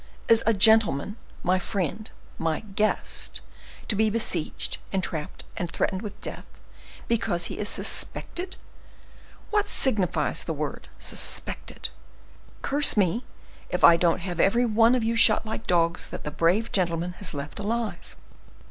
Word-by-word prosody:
Is 230 0 +5
a 225 - +5
gentleman, 210 -4 +5 0.3
my 185 +1 +2
friend, 195 +3 -3 0.3
my 165 -1 -1
guest, 210 0 -2 0.5
to 215 - 0
be 220 +1 +2
besieged, 205 -7 -1
entrapped, 175 -5 -3
and 175 - -3
threatened 190 +3 -2
with 205 -2 -8
death, - - -7 0.6
because 180 -7 0
he - - -5
is 210 - 0
suspected? 365 +1 -1 1.0
What 420 -1 +1
signifies 210 -9 +1
the - - -3
word, - - -5
suspected? - - -1 0.7
Curse 285 -4 +3
me 205 +5 +1 0.4
if - - -3
I 170 - +9
don't 170 +1 +1
have 175 -2 -5
every 235 +7 +3
one 230 +2 +4
of 245 - 0
you 230 +1 0
shot 230 - +6
like 220 +1 -6
dogs, 170 0 +1
that - - -8
the 150 - -4
brave 175 +9 +1
gentleman 175 -2 0
has 185 -6 -1
left 140 +5 -6
alive! 225 +2 -4
200 Hz, 140 wpm, -25 LUFS, 175-225 Hz, 1.0 s, I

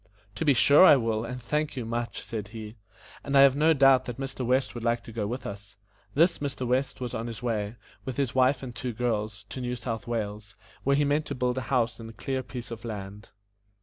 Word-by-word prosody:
"To - - -3
be 145 -4 +4
sure 140 +7 +7
I 185 - +9
will, 115 -4 0
and 125 +2 -5
thank 150 +5 -2
you 125 - -3
much," 120 +1 -3
said 110 -3 -5
he; 110 0 -8 0.5
"and 140 0 +1
I - - +9
have 135 -1 +7
no 155 +3 +4
doubt 135 -3 +5
that 125 - -6
Mr. 135 -1 -4
West 130 +2 +1
would 120 -1 -6
like 115 0 +1
to - - -10
go 110 -2 -2
with 125 +4 -5
us." 100 +1 -8 0.4
This 170 +4 +4
Mr. 135 -3 -3
West 130 +3 0
was 125 -2 -4
on 115 +1 -3
his 115 0 -7
way, 110 -2 -1 0.3
with 130 -1 -5
his 135 -4 0
wife 130 +1 +3
and 125 -2 -6
two 120 +1 -4
girls, 110 -3 -2
to 130 - -6
New 125 0 -2
South 115 -1 -5
Wales, 105 -3 -4 0.3
where 140 +1 +3
he 145 +1 +3
meant 145 +2 +1
to 140 - -3
build 125 0 0
a 130 - -7
house 120 -4 +1
and 115 0 -10
clear 135 -1 -2
a - - -5
piece 120 -2 -8
of 115 -2 -7
land. 105 -2 -7
120 Hz, 240 wpm, -27 LUFS, 115-135 Hz, 0.5 s, I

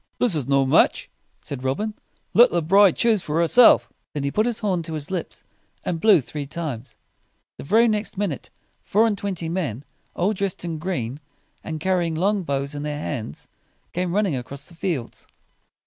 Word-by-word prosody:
"This 245 -6 +3
is 150 -6 -2
no 135 -1 +3
match," 130 - +3 0.3
said 135 -2 -7
Robin. 205 +12 -1 0.4
"Let 240 +2 +7
the 170 -2 0
bride 195 +3 +5
choose 225 -4 +2
for 155 +1 -2
herself." 220 +8 +6 0.2
Then 145 - -2
he 140 - -1
put 215 +7 +1
his 235 -2 -1
horn 190 -5 0
to 160 0 -5
his 150 +2 -6
lips, 180 -3 -5 0.4
and 165 -2 -2
blew 205 -7 +6
three 145 +2 -6
times. 135 -7 -6 0.6
The - - -6
very 225 +9 +4
next 210 -3 -2
minute, 195 -9 -3 0.3
four 215 +3 +2
and 220 -2 +1
twenty 190 -5 -4
men, 150 - -3 0.3
all 190 +5 +1
dressed 195 -3 -3
in 165 -2 -4
green, 145 -7 -3 0.4
and 160 -1 -5
car 185 +3 +1
ry 175 - 0
ing 165 -1 -2
long 200 +5 +1
bows 140 -3 -2
in 145 - -5
their 150 0 -3
hands, 120 - -5 0.5
came 180 0 -1
running 200 -7 +1
across 130 +3 -7
the - - -14
fields. 165 -8 -4
170 Hz, 190 wpm, -23 LUFS, 140-200 Hz, 0.6 s, Let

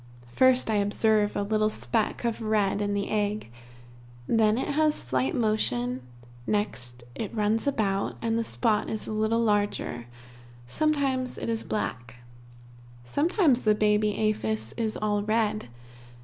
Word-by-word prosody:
First 260 -1 +4
I 215 - +2
observe 205 +1 +2
a 205 - 0
little 215 +1 +1
speck 220 +2 -1
of 230 0 -1
red 210 -2 +1
in 205 0 -1
the 200 0 -1
egg 210 - -1 0.7
then 220 - +3
it 265 - -2
has 305 +1 +2
slight 130 +1 -1
motion 130 - 0 0.5
next 125 - -2
it 215 - -5
runs 215 +3 +1
about, 200 -7 0
and 225 -1 -1
the 230 - +1
spot 220 -2 0
is 220 - -4
a - - -5
little 220 +2 +1
larger, 205 - 0 0.6
sometimes 270 - 0
it - - -4
is 225 -1 -1
black. 120 - -4 0.9
Sometimes 290 - +2
the 215 -1 +3
baby 210 0 +2
aphis 110 - -1
is 220 -2 -2
all 210 -1 0
red. 215 - 0
215 Hz, 140 wpm, -27 LUFS, 205-230 Hz, 0.9 s, First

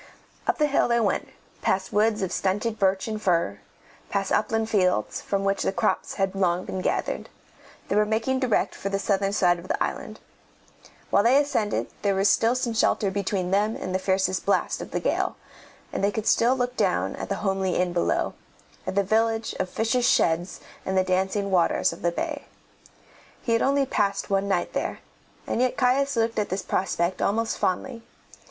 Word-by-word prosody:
Up - - +2
the 300 - +3
hill 285 -1 +2
they 235 0 +2
went, 215 -3 0 0.3
past 190 0 0
woods 215 0 +2
of 190 - -2
stunted 210 +4 -1
birch 190 0 +2
and 215 -1 -4
fir, 170 - +1 0.5
past 195 -1 -1
upland 220 +1 +1
fields, 185 - +1
from 195 -1 -1
which 195 0 0
the - - +1
crops 215 +2 -1
had 195 -1 0
long 185 -2 0
been 190 - -4
gathered. - - -2 0.6
They - - -1
were 210 - +5
making 225 +5 0
direct 255 -4 +1
for 195 - -4
the 195 - 0
southern 195 0 0
side 175 -4 +3
of 175 - -11
the - - 0
island. - - -5 0.9
While - - +5
they 245 +6 +5
ascended 225 -8 0 0.2
there 200 -1 +1
was 195 +1 +4
still 230 +2 +3
some 250 -2 -1
shelter 210 -2 +2
between 190 -2 -2
them 210 +3 +2
and 185 - -5
the 190 - +1
fiercest 190 0 0
blast 200 - 0
of - - -7
the - - -2
gale, - - 0 0.6
and - - -2
they 200 - +4
could 220 0 -3
still 240 +3 +4
look 250 -1 -2
down - - 0
at - - -6
the - - 0
homely 190 -1 0
inn 180 -1 0
below, 175 - 0 0.5
at - - -2
the 200 - +3
village 225 +2 +1
of 185 - -1
fishers' 240 +4 +1
sheds 170 +3 +1 0.2
and 190 0 -1
the 185 - +4
dancing 190 +2 0
waters 175 -3 +2
of - - -12
the 170 - +1
bay. 300 - -4 1.0
He 235 - -1
had 230 - +2
only 275 0 +2
passed 200 -5 -1
one 195 0 +1
night 195 - 0
there, - - -3 0.4
and 235 - -1
yet 255 -1 +1
Caius 270 +2 +2
looked 225 -1 +1
at 210 - -1
this 190 +1 -2
prospect 180 -1 -1
almost 225 +3 0
fondly. 230 +6 -1
200 Hz, 190 wpm, -25 LUFS, 190-225 Hz, 1.0 s, were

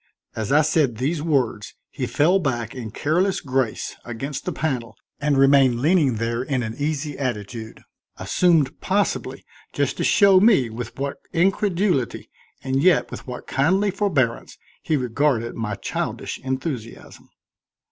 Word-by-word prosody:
As 110 0 -3
I 150 +2 +5
said 150 -6 +1
these 145 +6 -1
words 130 -9 -1 0.2
he - - -3
fell 175 +6 +3
back 120 - -2
in 125 -4 -6
careless 175 - 0
grace 130 -4 -2
against 135 +4 -5
the 180 - -1
panel 125 -8 -3 0.2
and 145 -1 +1
remained 135 -3 +5
leaning 150 -3 +3
there 115 +2 -1
in 130 -1 -1
an 110 0 -4
easy 150 0 -2
attitude, 115 -3 -5 0.3
assumed 165 -7 +2
possibly 200 +1 -1 0.3
just - - -1
to - - -1
show 200 -2 +5
me 190 - +4
with 115 +1 -7
what 140 +1 -3 0.2
incredulity, 180 - 0 0.3
and 135 0 0
yet 180 0 +3
with - - -8
what 125 -1 -7
kindly 190 +9 +1
forbearance 155 - -1 0.2
he 155 - 0
regarded 125 -1 0
my 105 -3 -3
childish 100 - -4
enthusiasm. 130 -3 -6
135 Hz, 140 wpm, -22 LUFS, 120-160 Hz, 0.3 s, I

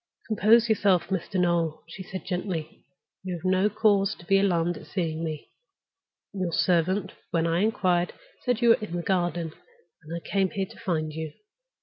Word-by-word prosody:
"Compose 225 +2 +5
yourself, 200 -6 +2
Mr. 190 0 -2
Noel," 170 -3 +1
she - - -9
said, 190 0 -7
gently. 180 -4 -4 0.4
"You 185 -1 -3
have 170 +1 -9
no 185 +2 +3
cause 205 -2 +2
to 175 - -15
be 195 +2 +4
alarmed 175 -3 +2
at - - -12
seeing 165 -4 -2
me. 155 -2 -5 0.8
Your 185 -3 -2
servant, 180 +3 +2 0.2
when 165 -1 +1
I 165 +1 +1
inquired, 180 -4 +2 0.3
said 245 -1 0
you 235 - +6
were 230 - +5
in 205 -5 -5
the 175 - -2
garden, 175 -3 0 0.5
and 155 0 -13
I 170 - -7
came 195 -1 +1
here 195 +1 -2
to - - -15
find 160 -8 -1
you. 160 -1 -5
180 Hz, 180 wpm, -27 LUFS, 170-200 Hz, 0.8 s, you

